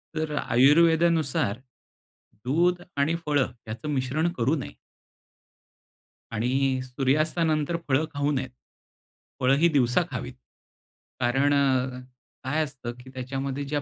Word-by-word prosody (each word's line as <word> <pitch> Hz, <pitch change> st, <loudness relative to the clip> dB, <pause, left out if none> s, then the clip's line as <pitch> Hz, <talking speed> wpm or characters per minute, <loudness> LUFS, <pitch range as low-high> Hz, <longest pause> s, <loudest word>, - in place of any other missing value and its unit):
तर 155 Hz, -1 st, -2 dB
अ, -, -, 0 dB
आयुर्वेदानुसार 155 Hz, -2 st, +3 dB, 0.9 s
दूध 175 Hz, +6 st, +2 dB, 0.2 s
आणि 145 Hz, +4 st, +2 dB
फळं 145 Hz, -4 st, +1 dB, 0.2 s
याचं 110 Hz, +7 st, -5 dB
मिश्रण 145 Hz, +4 st, 0 dB
करू 135 Hz, 0 st, +1 dB
नये. 135 Hz, -, -7 dB, 1.5 s
आणि 130 Hz, +4 st, 0 dB
सूर्यास्तानंतर 155 Hz, +5 st, 0 dB
फळं 145 Hz, +3 st, +2 dB
खाऊ 145 Hz, 0 st, 0 dB
नयेत. 130 Hz, -3 st, -2 dB, 0.9 s
फळं 130 Hz, +2 st, +4 dB
ही 165 Hz, +4 st, +5 dB
दिवसा 130 Hz, -1 st, +3 dB
खावीत. 125 Hz, 0 st, -5 dB, 0.9 s
कारण 135 Hz, +4 st, +2 dB
अ, 130 Hz, -2 st, +1 dB, 0.4 s
काय 150 Hz, +5 st, 0 dB
असतं, 130 Hz, -4 st, -6 dB
की 130 Hz, +1 st, -13 dB
त्याच्यामध्ये 135 Hz, +2 st, -4 dB
ज्या 145 Hz, +1 st, -2 dB
140 Hz, 115 wpm, -26 LUFS, 130-155 Hz, 1.5 s, ही